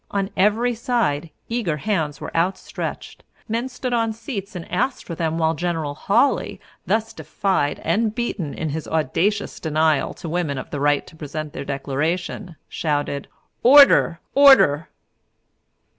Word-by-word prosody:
On 200 0 -2
every 215 +5 +2
side 225 - -1 0.2
eager 225 -10 -1
hands 155 -5 -1
were - - -8
outstretched, 175 +4 -3 0.2
men 235 +3 -2
stood 255 -1 -4
on 225 -2 +1
seats 215 -3 -6
and 175 - -6
asked 245 +9 -1
for 170 - -6
them, 165 -1 -2
while 160 -1 +2
General 165 -3 -2
Hawley, 225 - +1 0.3
thus 225 0 0
defied 185 -8 -1
and 215 +6 0
beaten 210 - -3
in 160 - -3
his 155 +2 -4
audacious 165 +7 0
denial 155 -2 +1
to - - -8
women 160 -4 -1
of - - -7
the 145 - -3
right 145 0 +2
to - - -15
present 155 0 -6
their 140 - -6
Declaration, 155 +7 -3
shouted, 145 -2 -2 0.3
"Order, 265 - +7
order!" 265 - +6
170 Hz, 145 wpm, -22 LUFS, 155-220 Hz, 0.3 s, Order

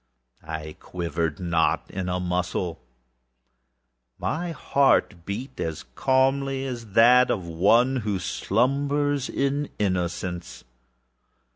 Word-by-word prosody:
I 80 -1 -6
quivered 85 -3 -3
not 85 -3 0
in 90 -1 -3
a 90 0 -1
muscle. 90 -1 -2 1.4
My 175 +3 -2
heart 135 - +2
beat 125 +7 -5 0.3
calmly 135 +1 +1
as 120 -6 -6
that 125 +3 +6
of 95 -5 -1
one 115 +10 +3
who 105 -5 -1
slumbers 140 +8 0
in 140 +1 -1
innocence. 90 -5 -2
105 Hz, 95 wpm, -25 LUFS, 90-135 Hz, 1.4 s, that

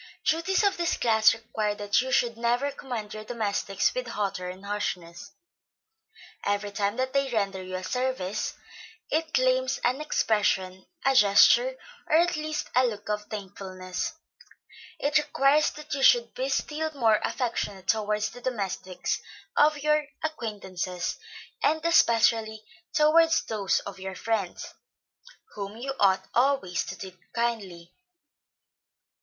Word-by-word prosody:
Duties 335 +6 +2
of 400 -1 +2
this 345 -1 0
class 220 -2 +5
require 220 -2 -2
that 205 +1 +1
you 260 +1 -4
should 235 -3 +2
never 240 +4 0
command 245 -6 -6
your 215 0 -7
domestics 205 -4 -1
with 255 -1 -3
hauteur 195 -5 -3
and 185 +2 -9
harshness. 180 -4 -4 1.1
Every 205 0 -1
time 205 +1 -1
that 260 +1 -2
they 275 -1 +1
render 200 -5 -1
you 185 0 -6
a 185 - -4
service, 250 -4 -2 0.6
it 315 +1 0
claims 255 0 +2
an 255 +4 +1
expression, 195 -9 0 0.2
a 270 - +4
gesture, 260 - +6 0.3
or - - +4
at 345 +2 +4
least 310 0 -3
a 255 0 +5
look 210 -3 -6
of 210 0 -2
thankfulness; 185 -3 -5 0.8
it 295 +2 +2
requires 295 0 +3
that 300 -1 -8
you 275 - -2
should 480 - +5
be - - -2
still 315 -5 -1
more 225 -5 +3
affectionate 205 -6 -2
towards 210 -1 +1
the 245 - -12
domestics 195 -6 -3 0.3
of 300 0 +4
your 300 -1 +2 0.2
acquaintances, 195 - -4 0.4
and 315 +2 +1
especially 225 -7 +3 0.3
towards 325 +2 +4
those 205 -4 0
of 195 -1 -8
your 190 0 -6
friends, 210 -3 -3 0.8
whom 200 +1 -6
you 270 +3 -4
ought 190 -1 +3
always 245 -9 +2
to - - -7
treat 185 -2 -9 0.2
kindly. 205 -8 -3
225 Hz, 135 wpm, -27 LUFS, 200-275 Hz, 1.1 s, gesture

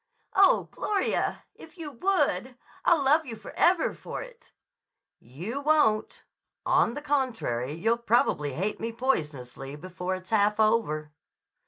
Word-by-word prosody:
"Oh, 390 0 +5
Gloria! 405 -2 -1
If 325 +2 -15
you 315 -3 -6
would! 380 +10 0 0.3
I'll 330 -5 +4
love 300 +4 +4
you 230 - -5
forever 345 +9 +1
for - - -7
it." - - -16 0.7
"You 180 - -6
won't. 290 -8 +2 0.4
On 235 - +3
the 290 - -6
contrary, 225 - -1
you'll 225 +7 +1
probably 215 - +1
hate 195 +9 -2
me 230 +1 -3
poisonously 145 - -2
before 180 +3 -4
it's 185 +2 -11
half 210 0 +3
over." 210 -10 +1
225 Hz, 130 wpm, -27 LUFS, -, 0.7 s, Oh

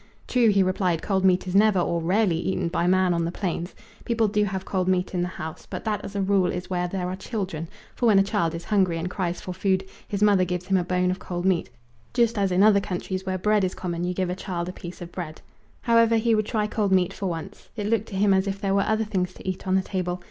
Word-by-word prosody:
True, 245 -2 +3
he 200 -2 +4
replied, 185 -3 0
cold 190 -2 0
meat 185 -1 +3
is 180 - -4
never 205 0 +5
or 170 -1 0
rarely 185 +1 +2
eaten 180 -1 -1
by 170 0 0
man 185 0 +3
on 170 0 0
the 165 - -1
plains. 175 -1 -3 0.3
People 230 -2 +1
do 210 0 +1
have 190 -1 -4
cold 185 -2 -1
meat 185 0 +1
in 180 - 0
the 175 - 0
house, 160 -3 -7
but - - -6
that 210 -2 -1
as 200 - -8
a 200 - 0
rule 190 -2 +2
is 180 +1 -5
where 180 -1 0
there 180 0 -3
are 185 - -3
children, 190 -6 -4 0.3
for 240 - 0
when 210 -3 +6
a 195 - +6
child 195 -5 0
is 165 - -6
hungry, 190 -5 +2
and 175 +2 -3
cries 180 -3 -2
for 185 - -5
food, 190 0 0 0.2
his 205 0 -1
mother 200 -3 +5
gives 180 0 -3
him 195 0 +2
a 180 - +1
bone 180 0 +1
of 185 - -4
cold 175 -1 -4
meat, 185 -3 +1 0.5
just 235 -3 +2
as 195 -2 +1
in 180 +2 +4
other 210 -1 +6
countries 190 0 -4
where 185 0 0
bread 210 +2 +2
is 185 - -1
common 175 -1 -3
you 180 0 -1
give 185 -1 -1
a - - -2
child 175 -2 -4
a 180 - -5
piece 175 0 -8
of 170 - -10
bread. 165 -4 -6 0.4
However, 230 -1 +4
he 230 +1 +2
would 215 -1 +1
try 215 -2 0
cold 210 -2 -1
meat 185 0 +3
for 195 - -4
once. 175 +3 -6
It 210 -3 -3
looked 220 0 0
to 200 - -7
him 200 +1 +4
as 190 +1 +2
if 195 0 -3
there 195 -1 0
were 200 - +3
other 220 +2 +1
things 185 -3 -2
to - - -12
eat 185 +1 -4
on 185 - +2
the 190 - +2
table. 180 -2 -3
190 Hz, 270 wpm, -25 LUFS, 180-205 Hz, 0.5 s, when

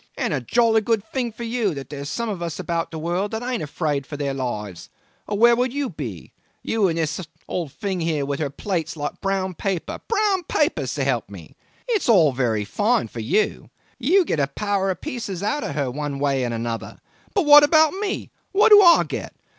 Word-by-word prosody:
And - - -1
a - - -1
jolly 230 -2 +3
good 220 -1 0
thing 250 -3 -1
for 230 +2 -8
you 230 -7 -1
that 135 -1 -8
there 145 -1 -6
are - - -6
some 235 +10 -3
of 200 -5 -4
us 170 -2 -4
about 170 -2 -2
the 160 - -7
world 175 +5 -1
that 220 +2 -4
aren't 250 -1 -2
afraid 145 -2 -2
of 145 - -4
their 140 -1 -2
lives, 105 -8 -5 0.4
or 205 - -2
where 235 +2 +6
would 250 +1 0
you 280 -2 -2
be 120 - -7 0.3
you 220 -3 +1
and 165 -2 -1
this 160 +2 -1 0.3
old 170 -6 -3
thing 195 - -3
here 160 -4 -1
with 140 0 -3
her 150 -3 -1
plates 165 +1 -3
like 145 0 -5
brown 190 -1 -1
paper 185 0 -3
brown 415 -4 +2
paper, 175 - 0
s'elp 130 -6 -1
me? 90 -6 -12 0.3
It's 440 - 0
all 170 -10 +6
very 115 -5 0
fine 205 - +1
for 115 - -8
you 120 - 0 0.3
you 345 +9 +3
get 160 - -1
a 140 - +2
power 195 +6 -1
of 185 - -3
pieces 230 - -5
out 290 +8 -1
of 140 - -4
her 140 -4 -1
one 145 +1 -4
way 140 -2 0
and 120 - -1
another; 115 0 -4 0.4
but 390 -5 +2
what 295 0 +10
about 315 0 +5
me 395 +1 -3 0.2
what 425 +3 +5
do 415 -1 +9
I 345 -3 +7
get? - - -6
180 Hz, 215 wpm, -22 LUFS, 140-235 Hz, 0.4 s, what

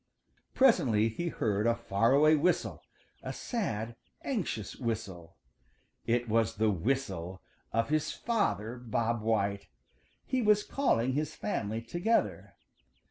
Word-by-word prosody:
Presently 135 - +4
he 170 +10 -4
heard 105 -8 0
a 115 - +3
far 115 0 +1
away 155 +3 +6
whistle, 170 +3 0 0.4
a - - -5
sad, 115 - -3 0.3
anxious 190 - -3
whistle. 100 -8 -5 0.7
It 120 +1 +1
was 115 -1 +1
the 110 0 +2
whistle 95 -4 -2 0.3
of 115 +2 0
his 155 0 +1
father, 125 - -1
Bob 115 -1 -1
White. 100 -2 0 0.6
He 260 -1 0
was 210 -2 +4
calling 130 - +1
his 150 +2 -2
family 110 - -3
together. 175 - -1
115 Hz, 120 wpm, -31 LUFS, 105-155 Hz, 0.7 s, away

